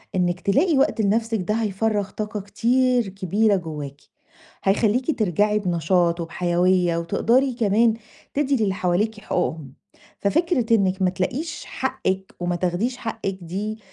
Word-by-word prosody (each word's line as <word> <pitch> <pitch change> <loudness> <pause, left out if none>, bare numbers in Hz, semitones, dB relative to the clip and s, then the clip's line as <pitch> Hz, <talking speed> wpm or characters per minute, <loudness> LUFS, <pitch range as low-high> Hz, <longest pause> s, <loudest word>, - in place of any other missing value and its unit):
إنِك 175 -1 +1
تلاقي 290 - +2
وقت 265 -4 +2
لنفسِك 225 +2 +1
ده 185 +4 -1
هيفرّغ 210 -1 0
طاقة 210 0 -4
كتير 245 +3 +1
كبيرة 200 +2 +1
جواكِ. 150 -6 -6 0.6
هيخليكِ 225 +9 +1
ترجعي 210 +1 +2
بنشاط 175 -1 +1
وبحيوية، 175 +1 +1
وتقدري 235 +10 +2
كمان 225 0 +3 0.4
تدي 285 -1 +1
للي 195 -2 +1
حواليكِ 195 +4 0
حقوقهم. 160 -8 -2 0.5
ففكرة 255 - +1
إنِك 190 -2 +1
ما 185 - +4
تلاقيش 255 - -3
حقِك 190 -7 -3
وما 175 0 -1
تاخديش 185 +8 -1
حقِك 225 -5 -4
دي 205 +6 -4
200 Hz, 125 wpm, -23 LUFS, 180-225 Hz, 0.6 s, ما